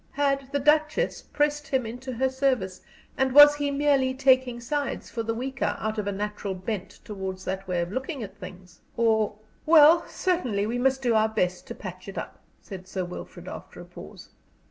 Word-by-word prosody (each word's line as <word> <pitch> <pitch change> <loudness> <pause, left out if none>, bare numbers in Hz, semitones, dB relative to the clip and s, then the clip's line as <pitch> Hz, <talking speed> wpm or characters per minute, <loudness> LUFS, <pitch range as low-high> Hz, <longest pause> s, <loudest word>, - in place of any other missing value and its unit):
Had 275 -1 0
the 285 - +1
Duchess 305 - +2
pressed 295 0 -1
him 260 -3 0
into 250 +3 -6
her 260 +3 +1
service, 260 -9 -1 0.4
and 265 -1 +2
was 290 0 +10
he 290 -1 -1
merely 280 -2 +2
taking 260 -2 +3
sides 285 +4 -3
for 230 - -3
the 225 0 -2
weaker 260 +2 -2
out 215 0 -3
of 205 - -3
a - - 0
natural 205 -1 -4
bent 190 +1 -5
towards 190 -2 -6
that 190 +1 -4
way 180 -2 0
of 170 +1 -4
looking 260 +2 -4
at 195 -1 -9
things? 180 -3 -12 0.2
Or 220 -3 +2 0.3
"Well, 320 +1 +7
certainly 250 - -1
we 235 +3 -2
must 265 +1 +1
do 240 -2 +2
our 220 0 +3
best 180 -4 -1
to - - -7
patch 185 -1 -9
it 195 - -8
up," - - -6 0.2
said 185 -2 -9
Sir 185 -1 -3
Wilfrid, 175 - -9
after - - -9
a - - -9
pause. - - -12
240 Hz, 190 wpm, -26 LUFS, 200-275 Hz, 0.4 s, was